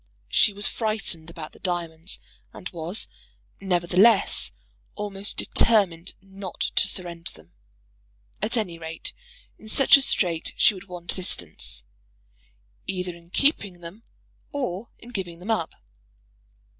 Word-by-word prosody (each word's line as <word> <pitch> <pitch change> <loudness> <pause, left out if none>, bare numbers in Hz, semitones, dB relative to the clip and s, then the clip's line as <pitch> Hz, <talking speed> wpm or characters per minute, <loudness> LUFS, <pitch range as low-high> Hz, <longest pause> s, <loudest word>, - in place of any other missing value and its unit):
She 210 - +5
was 205 +1 -4
frightened 205 -7 -2
about 165 -2 -8
the - - -18
diamonds, 170 -1 -1 0.3
and 185 - -7
was, 170 +4 -3 0.5
nevertheless, 185 - +5 0.4
almost 205 -1 -2
determined 190 -6 +3
not 195 -1 -8 0.2
to - - +5
surrender 170 -2 -4
them. 80 +2 -18 0.9
At 235 - +1
any 180 -7 -1
rate, 160 0 -5 0.5
in 220 - -13
such 270 +5 +7
a - - +1
strait 175 -10 +1
she - - +6
would 190 0 -10
want 175 -2 -3
assistance, 85 - -2 1.0
either 180 -2 -2
in 170 0 -17
keeping 200 - +2
them 175 +6 -9 0.5
or 235 -6 -3
in 235 - -13
giving 185 -7 -4
them 185 +6 -3
up. 190 -8 0
180 Hz, 125 wpm, -26 LUFS, 170-205 Hz, 1.0 s, such